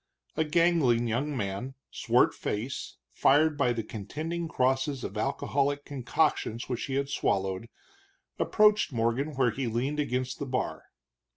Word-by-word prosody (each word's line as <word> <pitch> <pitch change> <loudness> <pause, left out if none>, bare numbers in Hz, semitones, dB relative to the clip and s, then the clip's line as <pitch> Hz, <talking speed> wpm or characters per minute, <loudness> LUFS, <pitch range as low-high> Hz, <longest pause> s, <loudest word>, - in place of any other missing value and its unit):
A 160 - +2
gangling 150 -7 +3
young 135 +5 -1
man, 105 +5 -3 0.2
swart - - +3
faced, 115 +6 -4
fired 150 +3 +4
by 125 -4 +2
the 115 -2 -2
contending 155 +12 -4
crosses 135 -1 0
of 100 - -5
alcoholic 140 +4 0
concoctions 125 -3 0
which 125 -2 -2
he 135 - -3
had 140 0 0
swallowed, 95 -4 -1 0.7
approached 210 -4 +4
Morgan 120 +5 0
where 130 -3 +3
he 130 +2 -3
leaned 130 +6 -1
against 130 -2 -1
the 140 - -4
bar. 125 0 -2
135 Hz, 135 wpm, -29 LUFS, 115-150 Hz, 0.7 s, fired